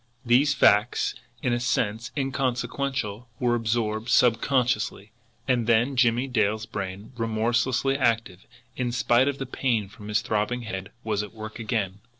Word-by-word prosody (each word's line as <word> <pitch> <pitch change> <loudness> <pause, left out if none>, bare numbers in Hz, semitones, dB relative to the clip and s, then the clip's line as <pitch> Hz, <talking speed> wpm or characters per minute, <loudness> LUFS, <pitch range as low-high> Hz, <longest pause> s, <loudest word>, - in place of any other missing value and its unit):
These 135 +5 +4
facts, 105 +4 +3 0.3
in 125 - +1
a 120 - +1
sense 115 -2 -1
inconsequential, 130 -3 -2
were 120 -2 +2
absorbed 115 -1 -1
subconsciously; 120 -4 +2 0.4
and 120 -3 +1
then 120 +4 +3
Jimmie 120 0 +3
Dale's 110 -3 0
brain, 100 -1 -6
remorselessly 115 +4 +1
active, 115 -6 0 0.3
in 125 -2 -1
spite 120 +1 +3
of 140 -1 -1
the 135 - -4
pain 120 -5 -1
from 105 +1 -12
his 105 0 +1
throbbing 115 +1 -1
head, 95 -3 -5
was 105 -2 0
at 105 +1 -8
work 110 +1 -8
again. 105 -4 -2
115 Hz, 145 wpm, -26 LUFS, 110-125 Hz, 0.4 s, These